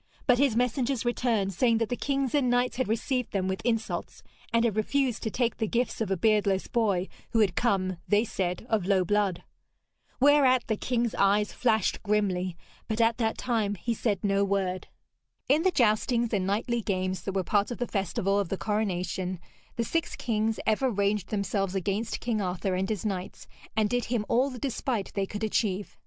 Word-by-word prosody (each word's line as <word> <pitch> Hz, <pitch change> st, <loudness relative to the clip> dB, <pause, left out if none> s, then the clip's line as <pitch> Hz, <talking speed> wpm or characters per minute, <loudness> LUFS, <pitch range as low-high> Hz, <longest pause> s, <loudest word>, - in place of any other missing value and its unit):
But 250 Hz, -2 st, +4 dB
his 275 Hz, -5 st, +3 dB
messengers 250 Hz, +1 st, 0 dB
returned, 230 Hz, -5 st, 0 dB
saying 230 Hz, +4 st, +3 dB
that 230 Hz, -1 st, -1 dB
the 245 Hz, -, 0 dB
kings 275 Hz, -1 st, -1 dB
and 280 Hz, -4 st, +2 dB
knights 245 Hz, 0 st, +1 dB
had 260 Hz, -, 0 dB
received 245 Hz, +3 st, -1 dB
them 190 Hz, -2 st, 0 dB
with 190 Hz, 0 st, -2 dB
insults, 225 Hz, -2 st, -2 dB, 0.3 s
and 230 Hz, 0 st, +3 dB
had 220 Hz, -4 st, +1 dB
refused 250 Hz, +2 st, 0 dB
to 220 Hz, -, -2 dB
take 235 Hz, +1 st, -1 dB
the 220 Hz, -, -1 dB
gifts 240 Hz, +2 st, -1 dB
of 215 Hz, -, -1 dB
a 195 Hz, -, 0 dB
beardless 205 Hz, -1 st, +2 dB
boy 200 Hz, -6 st, +1 dB, 0.3 s
who 225 Hz, -, +3 dB
had 200 Hz, -5 st, +3 dB
come, 185 Hz, -6 st, +1 dB
they 210 Hz, +2 st, +3 dB
said, 180 Hz, -2 st, -3 dB
of 215 Hz, -6 st, 0 dB
low 190 Hz, -2 st, +3 dB
blood. 205 Hz, -2 st, 0 dB, 0.8 s
Whereat 270 Hz, -2 st, +5 dB
the 220 Hz, -, 0 dB
king's 235 Hz, +1 st, -1 dB
eyes 205 Hz, +1 st, +2 dB
flashed 220 Hz, -5 st, +1 dB
grimly, 190 Hz, -4 st, 0 dB, 0.3 s
but 220 Hz, 0 st, -2 dB
at 230 Hz, +1 st, +3 dB
that 225 Hz, -1 st, 0 dB
time 220 Hz, -5 st, 0 dB
he 235 Hz, +5 st, -2 dB
said 210 Hz, -4 st, -1 dB
no 200 Hz, -1 st, +2 dB
word. 190 Hz, -2 st, -1 dB, 0.6 s
In 290 Hz, +4 st, +4 dB
the 375 Hz, -, +3 dB
joustings 235 Hz, -, +2 dB
and 190 Hz, -2 st, +1 dB
knightly 230 Hz, +4 st, 0 dB
games 185 Hz, -2 st, -2 dB
that 195 Hz, -, -4 dB
were 190 Hz, -, +1 dB
part 200 Hz, +3 st, +1 dB
of 240 Hz, -, -4 dB
the 245 Hz, -, -1 dB
festival 195 Hz, -1 st, 0 dB
of 200 Hz, -4 st, -1 dB
the 195 Hz, -, -2 dB
coronation, 185 Hz, -4 st, -2 dB, 0.4 s
the 235 Hz, -, 0 dB
six 330 Hz, +7 st, -1 dB
kings 220 Hz, -2 st, -1 dB
ever 220 Hz, +5 st, +2 dB
ranged 200 Hz, -2 st, 0 dB
themselves 200 Hz, -2 st, -1 dB
against 200 Hz, +4 st, -1 dB
King 230 Hz, -3 st, -1 dB
Arthur 185 Hz, 0 st, -2 dB
and 190 Hz, +1 st, -1 dB
his 215 Hz, -1 st, -2 dB
knights, 190 Hz, -3 st, -4 dB, 0.3 s
and 215 Hz, -1 st, +3 dB
did 245 Hz, +2 st, -1 dB
him 230 Hz, -3 st, -1 dB
all 255 Hz, +4 st, +2 dB
the 255 Hz, -, -8 dB
despite 245 Hz, -4 st, -2 dB
they 195 Hz, -1 st, -1 dB
could 210 Hz, +2 st, -5 dB
achieve. 205 Hz, -2 st, -1 dB
215 Hz, 195 wpm, -28 LUFS, 195-240 Hz, 0.8 s, Whereat